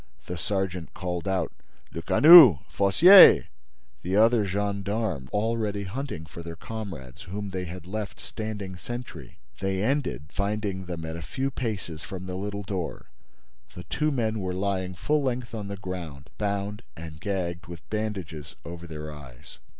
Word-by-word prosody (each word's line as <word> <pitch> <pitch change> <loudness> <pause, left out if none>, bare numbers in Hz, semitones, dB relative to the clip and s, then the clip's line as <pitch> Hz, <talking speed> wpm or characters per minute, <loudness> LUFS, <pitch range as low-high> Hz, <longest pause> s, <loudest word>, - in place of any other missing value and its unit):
The 90 - -5
sergeant 95 -2 -3
called 90 +1 -4
out: 95 -1 0 0.4
"Lecanu!—Fossier!" 155 - +8 0.5
The 95 +2 -2
other 110 0 +4
gendarmes 100 - -2
were 105 - +1
already 110 -2 -1
hunting 100 - -5
for 80 +2 -10
their 85 0 -7
comrades 85 - -8
whom 100 +1 -5
they 95 -1 -3
had 90 0 -8
left 105 +2 -5
standing 105 -4 -6
sentry. 120 +6 -8 0.2
They 95 0 -1
ended 130 - -1
by - - -27
finding 100 -2 -2
them 85 -2 -5
at 80 +1 -5
a - - -7
few 135 +11 -3
paces 105 - -4
from 95 -1 -7
the 90 - -5
little 100 +2 -4
door. 90 -9 -5 0.6
The 90 - -8
two 155 - -1
men 110 -6 -1
were 90 -2 -3
lying 95 -1 -2
full 150 - +1
length 125 -3 -2
on 105 -3 -5
the 100 0 -5
ground, 85 -8 -7
bound 100 0 -2 0.2
and 80 -2 -9
gagged, 90 -3 -3
with 85 -2 -10
bandages 95 -9 -4
over 85 0 -8
their 75 -1 -7
eyes. 65 -5 -13
95 Hz, 155 wpm, -26 LUFS, 85-110 Hz, 0.6 s, Lecanu!—Fossier